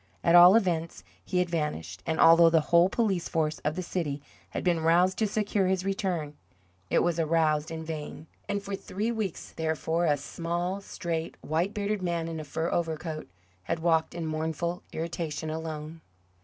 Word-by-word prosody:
At 170 - +4
all 175 +3 +9
events, 170 -6 0 0.2
he 185 - -2
had 180 -1 +2
vanished, 95 - -3
and 160 -1 -1
although 165 0 +8
the 165 0 +4
whole 170 +2 +7
police 195 -7 0
force 155 -1 0
of 150 - -2
the 185 - -3
city 155 -5 -2 0.3
had - - -4
been 175 -2 +2
roused 175 +3 +3
to 220 - +2
secure 205 -2 0
his 185 0 0
return, 185 -6 -2 0.6
it - - +3
was 170 -1 0
aroused 155 -1 +2
in 160 -1 -6
vain. 155 -1 -6 0.2
And 200 0 -1
for 200 0 -3
three 210 +4 -3
weeks, 215 -6 -4
therefore, 160 +1 -1
a 145 -1 +3
small, 175 +6 -3
straight, 165 -4 -4
white 165 +6 -1
bearded 205 0 -1
man 170 -2 -1
in 165 -1 -4
a - - -5
fur 160 +3 -3
overcoat 160 -1 -2 0.4
had - - -1
walked 160 0 +1
in 170 -1 -3
mournful 160 +2 -2
irritation 160 -1 -4
alone. 160 0 -6
165 Hz, 175 wpm, -28 LUFS, 160-180 Hz, 0.6 s, all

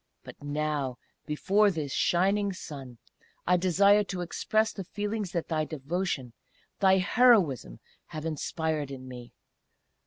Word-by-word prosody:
But - - -12
now, 145 -3 -2 0.3
before 200 +7 +3
this 155 -7 -3
shining 195 +6 +2
Sun, 135 -8 -9 0.5
I 180 - +4
desire 200 +3 +4
to 185 -2 -4
express 215 +5 0
the 195 - -6
feelings 205 0 -4
that 170 - -2
thy 155 -2 0
devotion, 155 -3 -3 0.5
thy 190 -1 +5
heroism, 190 - +3 0.3
have 155 0 -7
inspired 155 -1 -2
in 130 -1 -8
me. 125 -2 -10
170 Hz, 125 wpm, -28 LUFS, 145-195 Hz, 0.5 s, thy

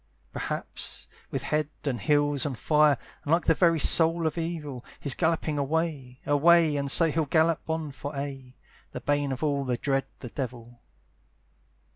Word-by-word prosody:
Perhaps, - - -6 0.2
with - - -3
head 150 -1 0
and 125 -7 -2
heels 145 -1 +2
on 135 - -4
fire, 150 +2 +3 0.3
And 145 - -3
like 170 +1 +3
the 165 - +5
very 165 0 +3
soul 165 +2 +4
of 155 - 0
evil, 160 -7 -4 0.2
He's 140 - +2
galloping 160 -3 0
away, 140 -4 -2
away, 160 +1 +4
And 140 -1 -2
so 165 +3 +4
he'll 160 +1 0
gallop 160 +2 +1
on 160 -2 -2
for 140 +2 -7
aye, 135 -2 -6 0.4
The - - -5
bane 145 -1 0
of 130 +3 -4
all 140 -2 0
that 125 -2 -2
dread 135 -2 +1
the 125 - -8
devil. 120 -2 -7
145 Hz, 165 wpm, -27 LUFS, 135-160 Hz, 0.4 s, the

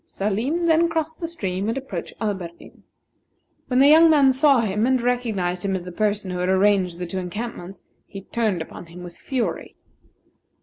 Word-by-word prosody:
Salim 230 - -2
then 335 +1 +3
crossed 320 -1 -3
the 335 - -3
stream, 200 - -3
and 230 - -2
approached 270 0 -6
Alberdin. 190 -6 -6 0.9
When 250 - 0
the 275 +2 +6
young 320 +2 +7
man 280 -4 +5
saw 270 -2 +4
him, 215 +1 0
and 260 0 +2
recognized 225 -8 -1
him 195 -1 -1
as 185 - -4
the 180 - -8
person 205 0 -1
who 180 - -4
had 180 +1 -1
arranged 190 -2 +2
the 180 - -4
two 185 +2 -4
encampments, 195 0 -7 0.2
he 195 - -9
turned 205 -5 -1
upon 170 - -11
him 175 +2 -11
with 175 -1 -10
fury. 255 -3 -4
210 Hz, 180 wpm, -22 LUFS, 185-265 Hz, 0.9 s, young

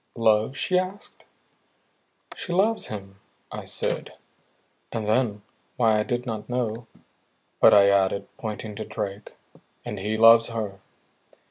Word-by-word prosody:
"Love?" 110 +3 +2
she 180 +9 +2
asked. 190 +3 -7 1.1
"She 175 - -6
loves 210 +5 +2
him," 100 -2 -8 0.3
I - - -7
said; - - -2 0.8
and 110 -3 -3
then, 110 -2 0 0.3
why 110 -3 +3
I - - +1
did 120 +2 -3
not 110 -2 -5
know, 120 -2 -2 0.7
but - - +7
I 100 -1 +7
added, 100 0 +1
pointing 110 -1 -6
to 110 - -4
Drake: 105 -1 -6 0.5
"and 105 - -5
he 105 +3 -2
loves 115 +1 +7
her." 110 -4 -5
110 Hz, 130 wpm, -25 LUFS, 105-120 Hz, 1.1 s, but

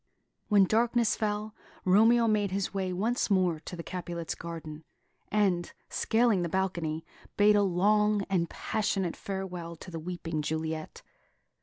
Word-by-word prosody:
When 205 -2 +5
darkness 230 +3 +2
fell, 210 0 -2 0.3
Romeo 225 +5 +5
made 210 -2 +2
his 195 +1 -2
way 190 -2 -1
once 220 +8 0
more 185 -5 +2
to 170 - -8
the 170 - -6
Capulet's 175 -2 -4
garden, 160 -2 -7 0.5
and, 190 -5 +1 0.2
scaling 225 -4 +2
the 170 - -1
balcony, 170 -4 -1 0.3
bade 210 0 +6
a 205 - +5
long 205 +2 +3
and 175 -4 0
passionate 195 -5 -1
farewell 180 -4 -5
to 180 +3 -11
the 165 - -5
weeping 165 -2 -4
Juliet. 160 +1 -4
190 Hz, 140 wpm, -29 LUFS, 170-210 Hz, 0.5 s, bade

